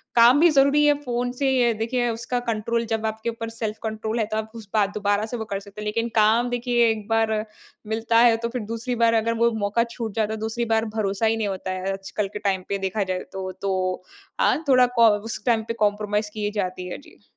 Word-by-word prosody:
काम 240 +4 +7
भी 340 +2 +6
जरूरी 280 +1 +4
है 295 - +6
फ़ोन 245 -1 -1
से, 270 +2 0
ये 245 -3 +3
देखिए, 240 +2 -1
उसका 235 +2 -2
कंट्रोल 230 +1 -1
जब 225 -1 -2
आपके 220 +1 -2
ऊपर 230 0 -5
सेल्फ 220 -1 -4
कंट्रोल 220 +1 -3
है, 220 - +1
तो 215 +1 -3
आप 220 0 -4
उस 220 -3 -9
बा 210 -2 +4
दोबारा 205 +1 +1
से 240 +2 -5
वो 220 - -4
कर 195 - -1
सकते 200 +1 -11
हैं। - - -6
लेकिन 230 +2 -1
काम 225 +3 +4
देखिए 240 -1 +2
एक 215 -1 -5
बार 225 -1 +2 0.5
मिलता 225 +1 +1
है, 235 -1 +6
तो 235 +1 -3
फिर 250 -1 -4
दूसरी 240 +2 -3
बार 230 - +4
अगर 230 0 0
वो 235 - +4
मौका 220 +3 +2
छूट 230 -2 -6
जाता 220 -1 0
है, 220 - -5
दूसरी 225 +2 -2
बार 220 0 +1
भरोसा 200 +1 0
ही 225 0 +2
नहीं 215 -2 -1
होता 190 -1 -4
है, 185 +1 -2
आजकल 195 +1 -3
के 210 - -4
टाइम 195 -3 -1
पे 200 - 0
देखा 195 +2 -1
जाए 185 -1 -2
तो। 190 -1 -5
तो 185 -2 -1 0.4
हाँ, 320 - +2
थोड़ा 255 -1 +6
कॉ 230 -1 +7
उस 220 +2 -6
टाइम 230 -2 +2
पे 230 - -2
कॉम्परोमाइज़ 210 0 -1
की 210 -1 -2
जाती 185 0 -4
है। - - -5
जी। - - -19
220 Hz, 240 wpm, -24 LUFS, 210-235 Hz, 0.5 s, काम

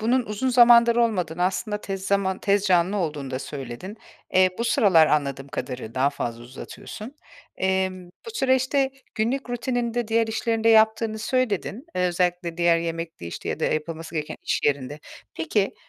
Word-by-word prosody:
bunun 245 +4 +2
uzun 210 +5 -2
zamandır 235 -1 +6
olmadığını 180 -8 0
aslında 210 +3 -1
tez 195 -2 -5
zaman 195 -1 +1
tez 200 -1 +2
canlı 185 +1 +3
olduğunu 150 -7 -3
da 130 - -2
söyledin. 140 - -7 0.4
Eee, 185 0 +5
bu 235 - -1
sıralar 200 - +5
anladığım 140 -2 -1
kadarı 125 -5 -6
daha 135 +2 +2
fazla 120 -4 -5
uzatıyorsun. 210 - -9 0.4
Emm, 190 -1 -1 0.2
bu - - -5
süreçte 265 - +2 0.2
günlük 245 +4 -1
rutininde 240 -1 -2
diğer 225 0 +2
işlerini 225 0 -1
de 230 - +5
yaptığını 220 0 +4
söyledin. 240 - -1
Eee, 180 0 +2
özellikle 175 -1 -1
diğer 170 -1 +3
yemekti, 165 - -5
işte, 85 - -6
ya - - -3
da - - +1
yapılması 165 +1 -3
gereken 150 -1 -3
iş - - -1
yerinde. 145 +1 -1 0.3
Peki, 195 +6 0
190 Hz, 160 wpm, -24 LUFS, 160-230 Hz, 0.4 s, zamandır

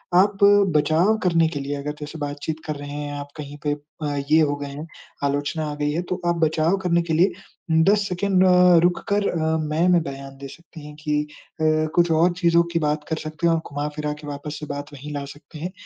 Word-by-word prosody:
आप 195 +2 +4 0.4
बचाव 160 +8 +3
करने 165 -2 +3
के 145 -3 -4
लिए 140 +1 -3
अगर 145 +1 -4
जैसे 150 +2 -7
बातचीत 145 +2 -4
कर 155 - -2
रहे 145 0 -8
हैं 145 0 -5
आप 145 - -6
कहीं 145 0 -7
पे 145 - +1 0.6
ये - - +6
हो 145 -2 +2
गए 145 - -5
हैं, 145 +4 -7 0.4
आलोचना 145 +3 -1
आ - - -5
गई 145 0 -1
है, 165 - -1
तो 180 0 -4
आप 170 - +2
बचाव 160 +4 +1
करने 170 -1 +2
के 170 -1 -3
लिए 180 +5 +4 0.5
10 205 +1 +3
सेकंड 185 +1 +2
अ, 180 -1 +6
रुक 175 0 +2
कर 200 0 +2
अ, 160 -1 0
मैं, 155 +3 0
में 175 -1 +4
बयान 135 -1 -8
दे 140 0 -8
सकती 160 0 -13
हैं 150 - -11
कि 150 -1 +1 0.4
अ, - - +2 0.3
कुछ 175 -1 +3
और 165 +3 +4
चीज़ों 170 -1 +4
की 165 - +2
बात 150 -1 0
कर 160 - -1
सकते 155 +2 -2
हैं 165 - +4
और 165 - +1
घुमा-फिरा 150 +1 -3
के 150 - -9
वापस 145 +1 -6
से 150 - -6
बात 145 +1 -6
वहीं 145 +2 -8
ला 145 -1 -3
सकते 145 +2 -12
हैं 175 +3 -4
155 Hz, 225 wpm, -23 LUFS, 145-170 Hz, 0.6 s, ये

